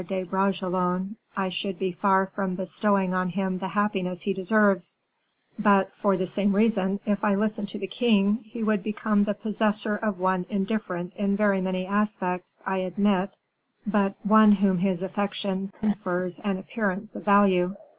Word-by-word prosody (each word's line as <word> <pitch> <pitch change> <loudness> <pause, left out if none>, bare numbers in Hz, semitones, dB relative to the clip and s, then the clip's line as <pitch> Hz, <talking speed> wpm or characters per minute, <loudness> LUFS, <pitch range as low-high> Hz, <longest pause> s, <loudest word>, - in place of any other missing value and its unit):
de 190 0 -2
Bragelonne, 185 0 -1 0.2
I 190 -1 0
should 185 +1 -3
be 190 0 -1
far 190 +1 +2
from 190 -1 -3
bestowing 190 +1 0
on 185 0 0
him 190 0 -2
the 190 - -3
happiness 190 -3 -1
he 200 - 0
deserves; 195 -1 +2 0.6
but, 200 -2 +4
for 200 -2 +1
the 185 - -1
same 200 +2 0
reason, 200 -2 +2
if 205 -1 -1
I 205 -2 +3
listen 215 0 -1
to 205 - -7
the 200 - -4
king 205 0 +2
he 225 +1 -6
would 215 -2 +1
become 210 0 0
the 205 -1 -1
possessor 210 0 -1
of 210 -2 -2
one 185 -1 0
indifferent 195 -3 -3
in 200 -1 0
very 200 -2 +2
many 185 0 -2
aspects, 195 -3 -2
I 190 0 -1
admit, 190 +1 0 0.5
but 200 -2 +1
one 215 0 +7
whom 195 -2 +2
his 190 -1 0
affection 195 0 -3
confers 185 -4 -2
an 200 -3 -2
appearance 205 +1 -3
of - - -7
value. 195 -2 +4
195 Hz, 165 wpm, -26 LUFS, 185-210 Hz, 0.6 s, one